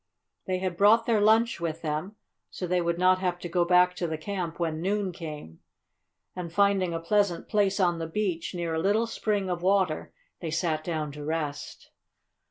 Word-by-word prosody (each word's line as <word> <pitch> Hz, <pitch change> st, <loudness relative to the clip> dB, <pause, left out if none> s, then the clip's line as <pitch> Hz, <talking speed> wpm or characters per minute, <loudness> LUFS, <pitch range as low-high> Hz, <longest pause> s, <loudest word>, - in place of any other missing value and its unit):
They 185 Hz, -1 st, 0 dB
had 185 Hz, -2 st, -3 dB
brought 220 Hz, +4 st, +5 dB
their 225 Hz, -3 st, +2 dB
lunch 225 Hz, +2 st, +3 dB
with 165 Hz, -1 st, -3 dB
them, 155 Hz, +7 st, -3 dB, 0.3 s
so 185 Hz, -, -5 dB
they 180 Hz, 0 st, +1 dB
would 170 Hz, 0 st, 0 dB
not 185 Hz, +1 st, +4 dB
have 180 Hz, -2 st, -1 dB
to 175 Hz, -, -6 dB
go 175 Hz, 0 st, +1 dB
back 180 Hz, +1 st, +4 dB
to 175 Hz, -, -1 dB
the 160 Hz, -1 st, -3 dB
camp 175 Hz, -1 st, -4 dB
when 160 Hz, -2 st, -1 dB
noon 195 Hz, +1 st, 0 dB
came, 150 Hz, -, -8 dB, 0.8 s
and, 175 Hz, -2 st, -5 dB
finding 195 Hz, -1 st, +2 dB
a 165 Hz, -, -2 dB
pleasant 190 Hz, +1 st, +1 dB
place 205 Hz, -2 st, +1 dB
on 175 Hz, -3 st, +2 dB
the 165 Hz, -, -3 dB
beach, 180 Hz, -1 st, -2 dB
near 170 Hz, -2 st, -2 dB
a 160 Hz, -, 0 dB
little 210 Hz, +5 st, +2 dB
spring 210 Hz, -3 st, -1 dB
of 175 Hz, -2 st, -2 dB
water, 185 Hz, -4 st, +1 dB, 0.3 s
they 165 Hz, -, -4 dB
sat 160 Hz, -1 st, -1 dB
down 155 Hz, -3 st, -3 dB
to 150 Hz, +1 st, -8 dB
rest. 150 Hz, -2 st, -4 dB
180 Hz, 190 wpm, -27 LUFS, 165-200 Hz, 0.8 s, brought